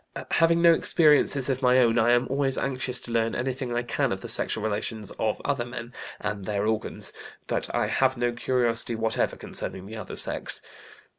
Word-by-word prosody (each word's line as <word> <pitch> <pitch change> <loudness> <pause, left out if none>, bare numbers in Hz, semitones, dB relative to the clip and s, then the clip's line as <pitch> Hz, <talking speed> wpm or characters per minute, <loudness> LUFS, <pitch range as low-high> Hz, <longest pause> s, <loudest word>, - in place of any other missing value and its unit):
Having 165 0 +4
had 170 - 0
no 170 -1 +8
experiences 150 -5 +3
of 135 -1 -1
my 125 -1 +4
own, 120 -2 +4
I 120 +2 +4
am 120 +1 +3
always 135 0 +1
anxious 130 -2 0
to 120 - -6
learn 115 0 0
anything 130 0 -3
I 120 - 0
can 120 - -1
of - - -3
the - - -7
sexual 110 - +2
relations 110 0 -3
of 110 -1 0
other 140 -4 0
men, 120 0 -8 0.3
and 105 -2 -4
their 100 +1 -1
organs, 110 0 -3 0.3
but - - -2
I - - +2
have 130 -1 +1
no 120 0 +1
curiosity 120 -1 0
whatever 110 0 0
concerning 95 - -6
the 110 +3 -8
other 105 -4 -7
sex. - - -1
120 Hz, 195 wpm, -26 LUFS, 110-130 Hz, 0.3 s, no